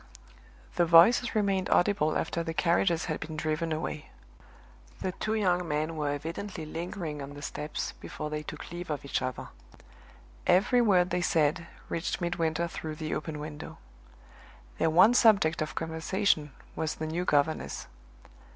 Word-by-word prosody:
The 175 - +4
voices 225 +9 +6
remained 195 -3 +1
audible 175 -5 +3
after 165 +1 -2
the 165 -1 -4
carriages 170 -1 +2
had - - -3
been 155 0 -6
driven 155 +2 -1
away; 155 -1 -4 0.9
the 190 - -2
two 215 +4 -2
young 180 -4 +1
men 155 +2 -1
were 150 -2 -1
evidently 160 +4 -4
lingering 165 -1 -5
on 140 +1 -8
the 145 - -9
steps 150 +1 -4
before 150 0 -7
they 150 0 -2
took 150 - -8
leave 175 0 -6
of 145 -2 -3
each 140 - -1
other. 130 0 -4 1.0
Every 240 +7 +4
word 185 -5 +3
they 180 - +1
said 160 +1 +1 0.2
reached 165 +1 -2
Midwinter 170 -1 0
through 160 -2 -6
the 155 0 -4
open 155 0 -4
window. 150 0 -7 1.0
Their - - +3
one 185 +8 +6
subject 200 -10 +4
of 155 - -3
conversation 160 -1 0 0.2
was 155 -1 -2
the 155 - -4
new 165 +3 -2
governess. 150 -1 0
165 Hz, 150 wpm, -29 LUFS, 155-180 Hz, 1.0 s, voices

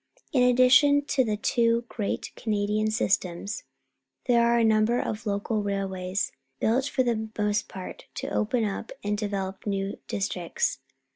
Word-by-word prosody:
In 260 - +4
addition 255 +3 +5
to 270 -2 +3
the 215 -3 -1
two 230 +2 +2
great 210 -4 -3
Canadian 210 0 0
systems, 200 -2 -1 0.6
there 240 -2 +4
are 235 0 +4
a 235 - +3
number 220 +2 +3
of 220 +1 -3
local 205 +2 -1
railways, 195 -1 -2 0.3
built, 250 +4 +2
for 265 -2 +1
the 220 -3 -1
most 210 0 0
part, 185 -1 -8
to - - -4
open 225 +1 0
up 205 +2 -4
and 205 0 0
develop 200 -2 -3
new 195 -1 -2
districts. 180 -3 -1
215 Hz, 145 wpm, -27 LUFS, 200-235 Hz, 0.6 s, addition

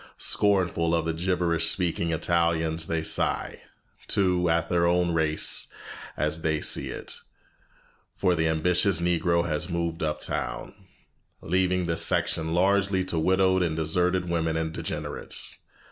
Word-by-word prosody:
Scornful 90 -5 +2
of 80 -1 -1
the 80 - -1
gibberish 85 -1 0
speaking 85 -1 -1
Italians, 80 -1 0
they 80 -1 -1
sigh, - - 0 0.5
too, 90 -3 +2
at 85 0 +1
their 85 -1 +2
own 90 0 +2
race 80 -2 +1 0.5
as 75 +1 -1
they 80 -1 0
see - - +1
it, - - -5 1.0
for 90 -2 +1
the 80 -1 +1
ambitious 85 +3 +2
Negro 85 0 +1
has 75 +2 -2
moved 85 0 -3
uptown, 75 -1 -3 0.7
leaving 90 +1 +1
this 85 -1 +2
section 80 0 +1
largely 95 +1 +2
to 90 -3 -2
widowed 95 +2 +2
and 85 -3 0
deserted 90 +3 0
women 80 -1 -1
and 80 0 -2
degenerates. - - -2
85 Hz, 130 wpm, -26 LUFS, 80-90 Hz, 1.0 s, Scornful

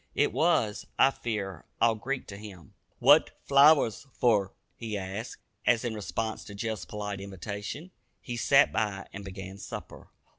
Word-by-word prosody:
It - - +2
was, 105 -1 +1
I 135 - +6
fear, 100 - -4 0.2
all 115 - +5
Greek 130 +5 -4
to 100 - -7
him. 95 -7 -11 0.2
"What - - +5
flowers 140 -3 +5
fer?" 105 -5 +3 0.2
he 110 -3 -4
asked, 100 +4 -6 0.2
as, 120 -1 +3
in 120 - -1
response 110 +1 -3
to 100 - -9
Jeff's 110 0 -3
polite 105 -2 -5
invitation, 100 - -6 0.3
he 120 - -6
"sat 135 +4 +5
by" 100 -3 -1
and 100 - -7
began 95 0 -8
supper. - - -8
105 Hz, 150 wpm, -29 LUFS, 100-120 Hz, 0.3 s, I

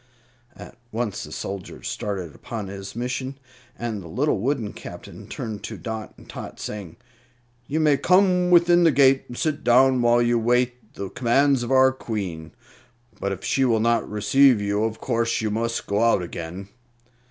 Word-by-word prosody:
At 120 - -12
once 110 -3 -3
the - - -12
soldier 95 -2 -6
started 95 -7 -4
upon 105 +2 -6
his 100 +1 -8
mission, 130 +3 -3 0.4
and 115 -4 -4
the 85 - -10
little 125 - 0
wooden 120 -2 -1
Captain - - -10
turned 110 -2 -6
to - - -6
Dot 110 -3 -6
and - - -16
Tot, - - -8
saying, 100 -6 -6 0.7
"You 155 +3 -1
may 150 -3 +4
come 180 +1 +3
within 175 0 +5
the 165 - +6
gate 135 -2 +4
and 120 - -9
sit 155 -3 -1
down 130 +1 +5
while 120 0 +4
you 120 0 +2
await 125 0 0
the 100 -1 -6
commands 130 +2 +2
of 120 - -4
our 130 0 +6
Queen; 95 -11 -5 0.7
but 100 - -2
if 95 - -5
she 135 - +1
will 115 -4 +3
not 115 +1 +1
receive 125 +4 +4
you, 100 +1 0
of 110 0 -4
course 115 -2 0
you 110 -1 -1
must 115 +2 -2
go 100 +2 0
out 115 -5 +3
again." 85 +3 -7
120 Hz, 175 wpm, -24 LUFS, 105-130 Hz, 0.7 s, the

